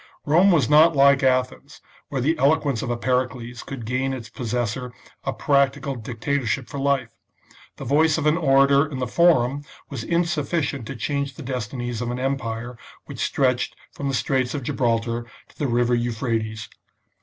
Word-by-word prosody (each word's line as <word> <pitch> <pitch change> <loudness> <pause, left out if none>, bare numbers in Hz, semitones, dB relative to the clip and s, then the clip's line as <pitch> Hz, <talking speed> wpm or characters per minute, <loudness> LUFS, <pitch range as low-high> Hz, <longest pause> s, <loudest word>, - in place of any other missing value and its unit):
Rome 170 +7 +5
was 155 - +3
not 155 +3 +6
like 140 0 +5
Athens, 130 -1 0 0.3
where 135 -3 -2
the 155 +6 +2
eloquence 140 -3 +2
of 135 - -4
a 120 - -1
Pericles 125 -1 -2
could 130 -5 -7
gain 130 +3 -1
its 115 -4 -7
possessor 120 +1 -3 0.3
a - - 0
practical 140 0 +1
dictatorship 120 +2 -2
for 140 - -6
life; 135 -4 0 0.7
the - - -7
voice 155 +2 +3
of 155 - -2
an 150 +1 +4
orator 140 -2 +4
in 140 -3 -6
the 130 - -1
Forum 145 -3 +3 0.3
was 130 -5 -4
insufficient 160 -5 -1
to 135 - -6
change 140 +3 -2
the 155 - -9
destinies 120 -1 -4
of 120 - -2
an 120 - -3
empire 120 -3 -3 0.3
which - - -9
stretched 125 -3 0 0.2
from 140 - -5
the 135 - 0
Straits 130 +3 0
of 140 - -4
Gibraltar 115 -1 -1 0.2
to - - -23
the 145 - 0
River 120 0 +1
Euphrates. 115 -2 -2
130 Hz, 165 wpm, -23 LUFS, 120-140 Hz, 0.7 s, not